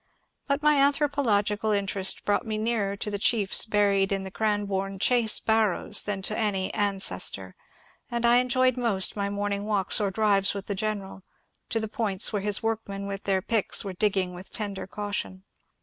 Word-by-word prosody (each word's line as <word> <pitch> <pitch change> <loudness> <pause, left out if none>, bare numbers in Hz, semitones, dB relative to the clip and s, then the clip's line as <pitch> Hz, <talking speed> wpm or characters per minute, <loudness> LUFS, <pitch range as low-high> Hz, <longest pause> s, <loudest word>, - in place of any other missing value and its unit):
But 280 +1 -1
my 300 -1 +4
anthropological 235 -8 +1
interest 195 -2 0
brought 205 - +1
me 220 -2 -3
nearer 215 -3 -1
to 210 - -4
the 205 - -3
chiefs 205 -2 +3
buried 200 -2 +2
in 195 -1 -1
the 190 - -7
Cranbome 200 -2 -1
Chase 235 0 +3
barrows 220 -2 +1
than 195 -2 -3
to 215 - 0
any 205 -4 -1
an 205 -2 +1
cestor, 95 - 0 0.6
and 235 0 -1
I 240 +1 +6
enjoyed 255 0 +2
most 220 -6 +1
my 200 -1 -2
morning 205 0 -3
walks 205 -1 +1
or 200 - +1
drives 200 -1 +1
with 200 -1 -5
the 200 - -3
general 200 -1 -4 0.5
to 225 - 0
the 220 - -3
points 215 -4 0
where 205 - -1
his 205 +2 0
workmen 215 -3 -3
with 200 0 -6
their 190 -2 +1
picks 220 -2 +1
were 195 - -4
digging 190 -2 0
with 180 +2 -10
tender 200 -3 -4
caution. 205 -2 -4
205 Hz, 180 wpm, -26 LUFS, 195-220 Hz, 0.6 s, I